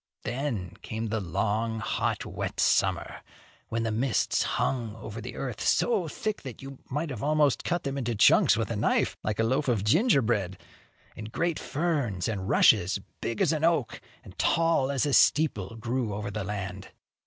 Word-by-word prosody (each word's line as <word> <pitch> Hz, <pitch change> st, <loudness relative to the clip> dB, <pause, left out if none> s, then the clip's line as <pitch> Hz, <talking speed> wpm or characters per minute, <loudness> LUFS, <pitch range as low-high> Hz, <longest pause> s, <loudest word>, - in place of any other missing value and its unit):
Then 115 Hz, -7 st, -3 dB
came 110 Hz, 0 st, -4 dB
the 110 Hz, +1 st, -1 dB
long, 105 Hz, +5 st, -1 dB
hot, 105 Hz, -, -1 dB
wet -, -, -5 dB
summer, -, -, +1 dB, 0.5 s
when 115 Hz, 0 st, -1 dB
the 115 Hz, -, -1 dB
mists 115 Hz, +1 st, +1 dB
hung 115 Hz, -5 st, -1 dB
over 110 Hz, 0 st, -8 dB
the 125 Hz, -, -7 dB
earth 125 Hz, -5 st, -5 dB
so 210 Hz, -8 st, +2 dB
thick 215 Hz, +7 st, -3 dB
that 130 Hz, -5 st, -8 dB
you 135 Hz, 0 st, -9 dB
might 150 Hz, +3 st, -2 dB
almost 150 Hz, -2 st, +2 dB
have -, -, -5 dB
cut 175 Hz, 0 st, 0 dB
them 140 Hz, 0 st, -3 dB
into 120 Hz, -3 st, -2 dB
chunks 100 Hz, -, +5 dB
with -, -, -2 dB
a -, -, -1 dB
knife, -, -, +1 dB
like 105 Hz, -1 st, -2 dB
a 115 Hz, -, +2 dB
loaf 130 Hz, +6 st, +1 dB
of 115 Hz, -6 st, +1 dB
gingerbread; 110 Hz, -, +2 dB, 0.6 s
and 110 Hz, +1 st, -8 dB
great 165 Hz, +4 st, -1 dB
ferns 140 Hz, -, -1 dB
and 100 Hz, -3 st, -3 dB
rushes, 100 Hz, -2 st, +4 dB, 0.2 s
big 115 Hz, -, -3 dB
as 170 Hz, -4 st, +3 dB
an 155 Hz, 0 st, -2 dB
oak 165 Hz, -7 st, +1 dB, 0.2 s
and -, -, -15 dB
tall 165 Hz, -5 st, +2 dB
as 140 Hz, 0 st, +1 dB
a 145 Hz, -, 0 dB
steeple, 115 Hz, -12 st, +3 dB
grew 115 Hz, -1 st, -2 dB
over 105 Hz, 0 st, -4 dB
the 105 Hz, -1 st, -3 dB
land. 100 Hz, -1 st, -5 dB
115 Hz, 175 wpm, -28 LUFS, 105-145 Hz, 0.6 s, chunks